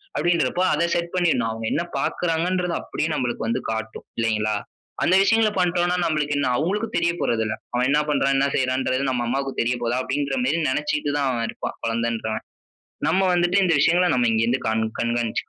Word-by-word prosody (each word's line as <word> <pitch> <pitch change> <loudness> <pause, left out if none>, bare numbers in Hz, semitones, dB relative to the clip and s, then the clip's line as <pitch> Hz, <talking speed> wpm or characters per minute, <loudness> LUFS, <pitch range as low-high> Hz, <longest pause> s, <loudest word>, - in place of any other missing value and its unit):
அப்படின்றப்போ 170 -1 +1
அதை 170 +3 +2
செட் 170 0 -2
பண்ணிடனும். 165 -10 +2
அவங்க 115 0 -5
என்ன 170 - +1 0.2
பாக்கறாங்கன்றத 175 +1 0
அப்படியே 160 - -3
நம்மளுக்கு 120 -4 -2
வந்து 120 +3 -1
காட்டும். 110 0 -5
இல்லைங்களா? 110 -2 0 0.5
அந்த 185 - +4
விஷயங்கள 225 +2 +4
பண்ட்டோம் 175 -1 +2
னா - - +2
நம்மளுக்கு 150 -3 0
என்ன 130 -3 +1
அவங்களுக்கு 200 +8 -1
தெரியப்போறதில்ல. 120 -10 0 0.2
அவன் 125 +1 +2
"என்ன 150 +2 +3
பண்றான், 135 -1 +2
என்ன 140 - +3
செய்றான்றது", 130 0 0
நம்ம 120 -2 -1
அம்மாவுக்கு 135 +2 -2
தெரியப்போகுதா? 120 0 -1
அப்படிங்குற 140 0 -1
மேரி 155 +5 +1
நினைச்சுட்டு 150 +1 -1
தான் 140 - +1
அவ 120 -2 -2
இருப்பான், - - -5
குழந்தன்றவ. 115 -1 -1 0.7
நம்ம 190 - +2
வந்துட்டு 175 +2 +2
இந்த 175 -3 +3
விஷயங்கள 175 +4 +4
நாம் 120 -2 +2
இங்கிருந்து 115 +4 +1
கண் 110 0 +1 0.2
கண்காணிச்சுக்கனும். 120 -1 -1
135 Hz, 165 wpm, -23 LUFS, 120-170 Hz, 0.7 s, அந்த